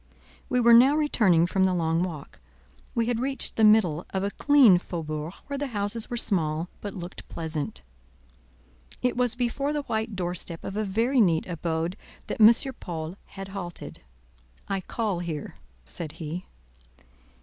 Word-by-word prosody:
We 250 - +2
were 235 -1 +6
now 260 +5 +7
returning 215 - +3
from 190 +2 +1
the 185 -1 +3
long 165 -1 +1
walk. 165 -6 -5 0.6
We 230 - +2
had 235 -1 0
reached 270 +2 0
the 220 - +2
middle 200 -7 +5
of 190 0 -2
a 200 - -1
clean 265 -11 +6
Faubourg, 155 -3 -5
where 280 -1 -4
the 285 - -2
houses 205 +3 -1
were 240 - -3
small, 165 -5 0
but 205 - -6
looked 175 -1 -8
pleasant. 155 - -4 1.2
It 250 - +1
was 245 -1 +1
before 260 +4 -1
the 295 -1 -2
white 220 -3 -2
door 175 -1 -2
step 170 -1 -4
of 195 - -5
a 215 0 -1
very 230 +6 +2
neat 170 -6 +3
abode 170 +1 -2 0.3
that - - -4
M. 215 +2 +10 0.3
Paul 165 -1 -5
had 195 0 -9
halted. 180 -3 -7 0.7
"I 195 -1 -1
call 210 -2 -2
here," 165 -4 -5 0.3
said 150 - -5
he. 165 +3 -6
190 Hz, 160 wpm, -26 LUFS, 170-230 Hz, 1.2 s, M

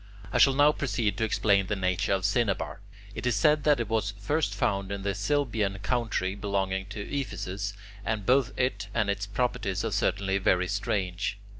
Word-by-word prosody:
I 125 - +2
shall 135 +2 +6
now 145 +2 +6
proceed 120 -8 -1
to - - +1
explain 100 -3 +2
the 105 - -1
nature 95 +2 0
of 95 -1 +1
cinnabar. 105 -1 0 0.3
It 125 - -3
is 120 - +2
said 150 +8 +3
that 150 -3 +4
it 115 - -1
was 105 -2 -1
first 150 +10 0
found 100 -6 0
in 100 -1 -4
the 100 0 0
Cilbian 105 -2 0
country 110 -5 0
belonging 95 -1 -2
to 105 +1 -6
Ephesus, 105 -7 -3 0.3
and 105 -1 -2
both 130 +1 +3
it 105 -6 0
and 100 -1 +2
its 100 0 -3
properties 100 -3 -1
are 115 - -1
certainly 100 -1 +1
very 90 -1 +2
strange. 100 -1 -1
105 Hz, 180 wpm, -28 LUFS, 100-120 Hz, 0.3 s, shall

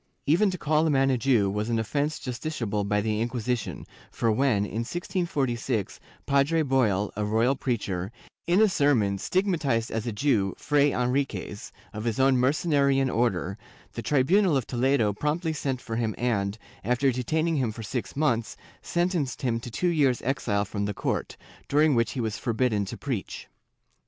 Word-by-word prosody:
^ - - -45 0.2
Even 175 +8 +4
to 185 - -3
call 155 0 +2
a - - +2
man 135 -2 +3
a 130 - +2
Jew 115 -5 +3
was 105 +3 -2
an 115 - +1
offence 145 +7 -1
justiciable 120 -6 -3
by 105 0 +1
the 110 0 -1
Inquisition, 120 0 -2 0.2
for 115 - 0
when, 110 -3 +2
in 110 - -4
1646, 135 - -2 0.3
Padre 140 +4 +2
Boil, 110 -8 +1
a 105 - -2
royal 110 +6 +2
preacher, 100 -7 -2 0.4
in 180 +5 +4
a - - +6
sermon 125 - +2
stigmatized 160 - 0
as 110 +1 -3
a - - -1
Jew 105 -5 +1
Fray 145 -1 +2
Enrlquez, 125 -4 -2 0.2
of 105 +1 -5
his 115 +1 -1
own 135 0 +4
Mercenarian 140 0 +2
Order, 100 -4 0 0.3
the 115 - -4
tribunal 155 - +3
of 130 - -2
Toledo 125 -4 +1
promptly 155 - -1
sent 135 -3 -2
for 115 -2 -5
him 115 -2 -1
and, 105 -4 -1 0.3
after 125 +5 +2
detaining 155 +6 0
him 125 -5 0
for 115 +1 -8
six 115 +3 -4
months, 120 -6 0 0.2
sentenced 170 - -1
him 115 -3 0
to 120 - -8
two 175 +10 0
years' 140 -7 +2
exile 105 -6 0
from 100 0 -3
the 105 -1 -3
court, - - -2 0.3
during 150 +1 +4
which 115 -2 +1
he 135 - -4
was 110 -2 -2
forbidden 115 -4 0
to - - -7
preach. 130 -8 -5
125 Hz, 170 wpm, -26 LUFS, 110-145 Hz, 0.4 s, a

